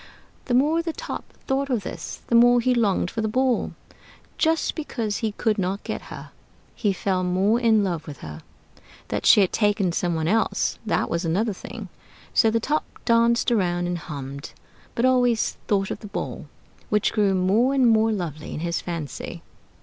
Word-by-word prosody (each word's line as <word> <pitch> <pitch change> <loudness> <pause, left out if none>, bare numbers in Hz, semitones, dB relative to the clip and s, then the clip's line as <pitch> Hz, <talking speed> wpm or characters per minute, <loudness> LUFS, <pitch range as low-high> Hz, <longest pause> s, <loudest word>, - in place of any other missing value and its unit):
The 245 - +1
more 300 +6 +3
the 330 -1 -4
Top - - -7
thought 275 +1 0
of 240 -6 0
this, - - -7
the - - -4
more 240 +1 +6
he 250 +2 +2
longed 205 -6 +1
for 225 - -3
the 220 - 0
Ball. 255 +2 +1 0.7
Just 325 0 +2
because 230 -9 -3
he 220 -3 -2
could 215 0 0
not 190 +2 -2
get - - -4
her, - - -9 0.4
he 205 - 0
fell 185 -1 -1
more 190 +6 +2
in 225 -3 +4
love 170 -5 -3
with 145 -3 -9
her. 75 0 -8 0.7
That - - -1
she 210 - +8
had 190 - +1
taken 205 -4 +2
some 175 0 -1
one 160 0 -1
else, 220 +5 +1
that - - +1
was 170 +2 -2
another 195 +7 0
thing. - - -8 0.5
So 225 - +5
the 230 +1 +1
Top 300 +7 0 0.2
danced 235 +1 +3
around 175 -5 +1
and 175 0 -2
hummed, 140 -2 -7 0.4
but 235 - +1
always 245 -3 +2
thought 195 -2 +1
of - - -4
the 210 - -9
Ball, 200 - -5 0.4
which 210 0 +1
grew 205 -3 +2
more 200 +8 +3
and 260 -3 +4
more 225 0 +4
lovely 165 -7 -4
in - - -5
his 170 0 -1
fancy. 165 -6 -6
210 Hz, 185 wpm, -24 LUFS, 180-235 Hz, 0.7 s, she